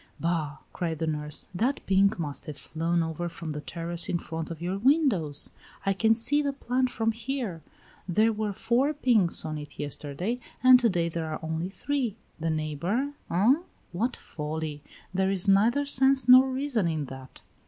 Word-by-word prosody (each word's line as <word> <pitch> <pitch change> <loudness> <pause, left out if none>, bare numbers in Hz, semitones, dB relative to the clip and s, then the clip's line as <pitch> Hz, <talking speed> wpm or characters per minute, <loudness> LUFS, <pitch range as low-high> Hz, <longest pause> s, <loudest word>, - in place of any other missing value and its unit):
"Bah!" 160 -3 -1 0.2
cried 165 -3 -2
the 160 - -1
nurse. 150 -1 -2
"That 245 +10 0
pink 195 +2 +3
must 150 -4 -5
have 150 -2 -6
flown 165 +5 -1
over 165 +2 -3
from 165 -1 -6
the 150 0 -4
terrace 170 +2 -3
in 175 - +1
front 165 -1 -5
of 165 -2 -6
your 180 +3 -2
windows. 220 - +2 0.3
I 195 - +3
can 225 +3 +3
see 260 +6 +1
the 285 -1 -1
plant 255 -1 0
from 225 -2 0
here; 230 -7 -4 0.5
there 220 +5 +3
were 210 -1 -2
four 255 +9 +1
pinks 225 - +2
on 155 -1 -3
it 145 0 -10
yesterday, 150 - -3 0.2
and 255 0 +9
to 240 -2 +3
day 175 -3 0
there 165 -1 -3
are 155 - -3
only 160 +3 -2
three. 250 0 -2 0.2
The 165 +1 -1
neighbor, 160 - -1 0.2
eh? 200 +9 +4 0.4
What 230 +8 -1
folly! 150 -1 -5 0.3
There 190 0 +1
is 195 0 +1
neither 225 +9 +4
sense 265 -2 +4
nor 255 +1 +8
reason 260 -7 0
in 155 -3 -1
that." 130 0 -11
185 Hz, 175 wpm, -27 LUFS, 160-245 Hz, 0.5 s, and